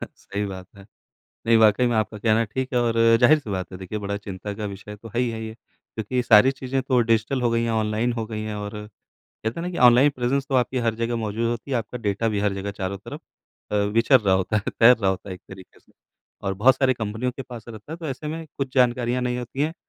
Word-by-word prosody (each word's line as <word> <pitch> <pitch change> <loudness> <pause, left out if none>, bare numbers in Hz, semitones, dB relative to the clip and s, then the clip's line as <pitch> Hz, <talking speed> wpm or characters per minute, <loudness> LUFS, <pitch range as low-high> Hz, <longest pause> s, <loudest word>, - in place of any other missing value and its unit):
सही 100 +1 -5
बात 95 -2 -7
है। 100 - -13 0.6
नहीं 115 0 +5
वाक़ई 110 +2 +5
में 120 - +1
आपका 110 0 -1
कहना 110 +1 +2
ठीक 130 +6 -4
है - - +3
और 115 -1 +1 0.3
ज़ाहिर 150 +6 +6
सी 125 -8 -9
बात 95 -1 -4
है 90 - -7
देखिए 95 +3 -5
बड़ा 100 0 -2
चिंता 100 0 -6
का - - -2
विषय 100 +1 -8
तो 115 +2 -12
है 120 - +1
ही 125 -2 +1
है 110 0 -5
ये। 110 0 -7
क्योंकि 110 0 -10
ये 125 - +3
सारी 120 +2 +6
चीज़ें 135 0 -3
तो 130 -1 +2
डिजिटल 115 +4 +1
हो 120 - +2
गई 115 0 +1
हैं, 115 - -1
ऑनलाइन 110 +2 0
हो 115 -2 -3
गई 110 -1 -5
हैं 110 -1 -4
और 105 0 -5 0.7
कहते 115 +8 -2
हैं - - -4
ना, - - -3
कि - - -4
ऑनलाइन 125 +4 +6
प्रेजेंस 130 +2 0
तो 135 - -2
आपकी 125 0 +1
हर 115 - +1
जगह 115 +1 0
मौज़ूद 110 +1 -2
होती 120 +3 -5
है। 130 - +1
आपका 115 +2 -4
डेटा 100 +3 0
भी 105 -2 -1
हर 105 -1 +1
जगह 100 +1 -4
चारों 95 0 -3
तरफ - - -9 0.5
अ, - - +2
विचर 115 +5 +3
रहा 100 -3 +2
होता 95 +3 0
है 100 - -1
तैर 120 +2 +8
रहा 100 -4 +1
होता 95 +1 -5
है - - -4
एक 90 - -14
तरीके 95 -1 -13
से - - -29 0.5
और 95 - -1
बहुत 125 +7 +4
सारी 130 -1 +2
कंपनियों 110 +2 -3
के 135 - -7
पास 120 -4 -10
रहता 110 +7 -9
है - - -5
तो 165 - -6
ऐसे 140 +2 -5
में 160 +1 -5
कुछ 135 -1 -3
जानकारियाँ 125 -1 +2
नहीं 125 0 -1
होती 125 +2 -6
हैं। 160 +2 -1
115 Hz, 265 wpm, -24 LUFS, 105-125 Hz, 0.7 s, तैर